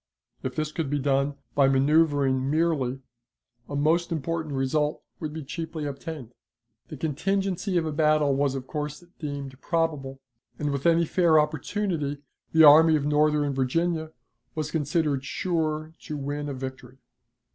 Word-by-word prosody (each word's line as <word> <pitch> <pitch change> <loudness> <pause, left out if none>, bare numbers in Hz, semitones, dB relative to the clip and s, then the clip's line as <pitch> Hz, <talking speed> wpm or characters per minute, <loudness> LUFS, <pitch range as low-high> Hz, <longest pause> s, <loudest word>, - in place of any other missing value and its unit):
If 130 - -4
this 155 -1 -2
could 155 -3 -3
be 145 - 0
done 140 0 +1 0.2
by 140 -1 +4
manoeuvering 140 -1 +3
merely, 145 -5 0 0.7
a 145 - -4
most 165 +4 +2
important 160 -1 -2
result 150 +3 0 0.2
would 155 -3 -4
be 155 0 -6
cheaply 160 +2 -5
obtained. 140 -3 -6 0.5
The - - -8
contingency 185 +4 -1
of 165 - +1
a 155 - -2
battle 150 -1 +3
was 135 0 +1
of 130 -1 -5
course 150 +3 -5 0.2
deemed 140 -3 -6
probable, 150 -5 -1 0.4
and, 145 -1 -1
with 140 +2 0
any 170 0 +4
fair 165 -2 +4
opportunity, 150 0 -1 0.3
the 160 0 +6
Army 155 +2 +8
of 145 -2 0
Northern 150 -1 +2
Virginia 160 +5 0 0.4
was 155 -1 -3
considered 150 -2 0
sure 155 0 -2
to 150 - -6
win 145 +1 -3
a 140 - -4
victory. 130 -1 -8
150 Hz, 145 wpm, -26 LUFS, 140-160 Hz, 0.7 s, Army